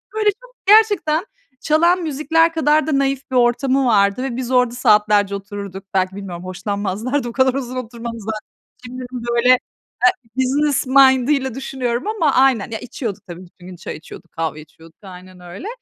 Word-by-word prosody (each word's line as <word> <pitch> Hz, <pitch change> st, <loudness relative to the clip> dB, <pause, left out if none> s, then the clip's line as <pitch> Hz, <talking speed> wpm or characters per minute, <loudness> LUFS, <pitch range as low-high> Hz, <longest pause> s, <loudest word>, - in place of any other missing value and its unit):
Böyle 430 Hz, -1 st, +2 dB
çok -, -, -18 dB
gerçekten 405 Hz, -6 st, +4 dB, 0.4 s
çalan 340 Hz, +4 st, +3 dB
müzikler 325 Hz, +2 st, +1 dB
kadar 310 Hz, -1 st, +2 dB
da 290 Hz, -, +1 dB
naif 275 Hz, 0 st, -2 dB
bir -, -, -2 dB
ortamı 255 Hz, +2 st, +2 dB
vardı 200 Hz, 0 st, +2 dB
ve 265 Hz, -3 st, -3 dB
biz 255 Hz, -1 st, -4 dB
orada 250 Hz, -2 st, +2 dB
saatlerce 210 Hz, -4 st, +3 dB
otururduk. 200 Hz, -1 st, -7 dB
Belki 190 Hz, 0 st, 0 dB
bilmiyorum 185 Hz, -3 st, -7 dB
hoşlanmazlardı, 205 Hz, +7 st, -3 dB
o -, -, -6 dB
kadar 260 Hz, +1 st, +2 dB
uzun 255 Hz, -2 st, -4 dB
oturmamızdan. 230 Hz, -3 st, -6 dB, 0.5 s
Şimdi 255 Hz, +1 st, -7 dB
ben 245 Hz, -2 st, -5 dB
böyle, 240 Hz, +1 st, +2 dB
eee, 255 Hz, -, +7 dB, 0.8 s
business 275 Hz, +2 st, +1 dB
mind'ıyla 265 Hz, 0 st, +4 dB
düşünüyorum 255 Hz, -1 st, -3 dB
ama 340 Hz, -10 st, +1 dB
aynen. 260 Hz, -6 st, +3 dB
Ya, 220 Hz, -, -4 dB
içiyorduk 220 Hz, -5 st, -6 dB
tabii, 175 Hz, 0 st, -9 dB
bütün 175 Hz, +1 st, -18 dB
gün 185 Hz, -1 st, -10 dB
çay 175 Hz, -, -7 dB
içiyorduk, 155 Hz, -, -13 dB
kahve 160 Hz, -1 st, -3 dB
içiyorduk, 160 Hz, +2 st, -17 dB
aynen 185 Hz, -1 st, -13 dB
öyle. 180 Hz, -, -9 dB
250 Hz, 165 wpm, -19 LUFS, 200-275 Hz, 0.8 s, eee